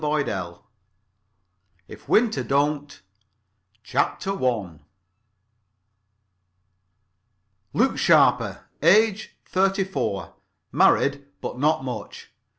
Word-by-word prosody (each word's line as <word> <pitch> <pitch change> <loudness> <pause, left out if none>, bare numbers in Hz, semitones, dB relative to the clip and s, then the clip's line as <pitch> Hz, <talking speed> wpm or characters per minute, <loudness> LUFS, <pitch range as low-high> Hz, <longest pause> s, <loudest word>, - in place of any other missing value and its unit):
[Pg 150 -1 0
1] 90 -4 -5 1.3
IF - - -14
WINTER 220 -1 +2
DON'T 145 -2 -1 0.8
CHAPTER 140 +9 -1
I 115 - -2 2.9
Luke - - +1
Sharper. - - +3 0.2
Age, 210 +5 +3
thirty 195 +1 +1
four. 185 - -4 0.4
Married, 140 0 +2
but 125 - -6
not 155 0 +1
much. 125 - -7
145 Hz, 75 wpm, -23 LUFS, 125-190 Hz, 2.9 s, Sharper